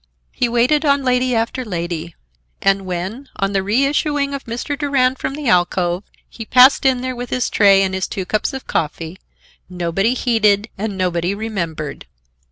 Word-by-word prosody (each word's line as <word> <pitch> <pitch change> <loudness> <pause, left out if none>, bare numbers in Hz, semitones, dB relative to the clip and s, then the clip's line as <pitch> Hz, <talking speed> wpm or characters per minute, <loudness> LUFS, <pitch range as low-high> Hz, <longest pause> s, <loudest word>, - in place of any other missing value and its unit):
He 245 - 0
waited 250 +6 +2
on 280 -2 +2
lady 250 -1 +1
after 230 +3 -1
lady, 170 -5 -4 0.4
and 195 -1 +1
when, 190 +10 -5
on 195 0 -1
the 195 - +1
reissuing 280 - 0
of 275 - -5
Mr. 240 +4 -4
Durand 270 -3 +1
from 275 - -3
the 295 -2 -5
alcove, 180 -1 +1 0.2
he 225 - -9
passed 255 +4 +5
in 255 -2 +2
there 255 0 -3
with 245 0 -6
his 250 -2 -1
tray 195 -2 +5
and 190 -1 -1
his 190 0 -1
two 190 - -4
cups 215 +7 -1
of 265 -1 -7
coffee, 165 +3 -3 0.5
nobody 180 +6 0
heeded 220 -4 +2
and 205 -1 -4
nobody 180 0 0
remembered. 170 - -5
220 Hz, 170 wpm, -19 LUFS, 185-255 Hz, 0.5 s, passed